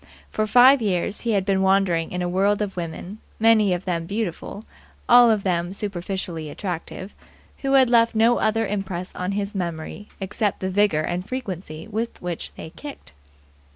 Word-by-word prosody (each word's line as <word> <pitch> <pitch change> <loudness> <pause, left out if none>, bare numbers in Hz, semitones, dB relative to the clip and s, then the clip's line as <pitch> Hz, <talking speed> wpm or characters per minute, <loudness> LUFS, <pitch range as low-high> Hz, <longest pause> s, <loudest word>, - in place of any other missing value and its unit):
For 215 0 -1
five 250 +4 +7
years 200 -1 -1
he 230 -2 0
had 195 -2 +1
been 195 -1 +1
wandering 190 -4 +2
in 180 0 -2
a - - -1
world 195 +3 +2
of 200 -2 -5
women, 175 +4 -6 0.2
many 220 -3 +5
of 180 0 -2
them 170 -3 -2
beautiful, 205 0 -4 0.4
all 240 0 +8
of 215 -3 +2
them 175 -1 -1
superficially 185 -5 -4
attractive, 185 +3 -6 0.5
who 275 -1 -1
had 265 -2 +6
left 230 -1 +3
no 230 +2 +4
other 225 +1 +1
impress 195 -3 -4
on 180 +2 -2
his 200 0 -3
memory 175 +2 -5
except 205 +1 -2
the 190 0 -2
vigour 200 -5 +2
and 180 +4 -3
frequency 185 -10 -6
with 225 +2 -4
which 175 -2 -5
they - - -9
had 160 - -10
kicked. 285 - -10
195 Hz, 175 wpm, -23 LUFS, 180-220 Hz, 0.5 s, all